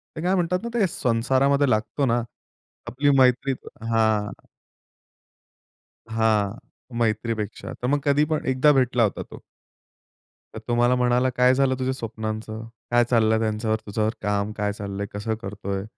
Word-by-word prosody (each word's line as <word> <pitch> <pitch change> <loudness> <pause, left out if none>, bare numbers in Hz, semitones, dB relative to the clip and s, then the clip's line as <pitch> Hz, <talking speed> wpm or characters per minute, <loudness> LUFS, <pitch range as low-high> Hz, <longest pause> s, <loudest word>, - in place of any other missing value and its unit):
ते 155 - -5
काय 185 +2 +1
म्हणतात 180 0 0
ना 235 - -3
ते 210 -5 +2
संसारामध्ये 135 +2 +1
लागतो 110 +6 0
ना, 120 -1 +2 0.7
आपली 145 +3 +1
मैत्री 130 +1 +3 0.4
हां. 110 -2 +2 1.8
हां. 110 -3 +1 0.4
मैत्रीपेक्षा. 110 -1 -2
तर 125 - -4
मग 145 +2 +2
कधी 145 +1 +3
पण 155 0 -2
एकदा 130 +3 +4
भेटला 125 -3 +2
होता 105 - -1
तो. - - -13 1.1
तर - - -6
तो 120 - 0
मला 120 +1 +3
म्हणाला, 125 +1 +2
"काय 125 +1 +5
झालं 135 -1 +2
तुझ्या 130 0 0
स्वप्नांचं? 110 -2 -5 0.3
काय 120 0 +5
चाललंय 110 -2 +3
त्यांच्यावर 110 0 0
त्याच्यावर 110 +2 -1
काम 105 0 -1
काय 105 0 0
चाललंय? 100 -1 -5
कसं 110 +2 -2
करतोय?" 100 -1 -4
115 Hz, 145 wpm, -24 LUFS, 110-130 Hz, 1.8 s, काय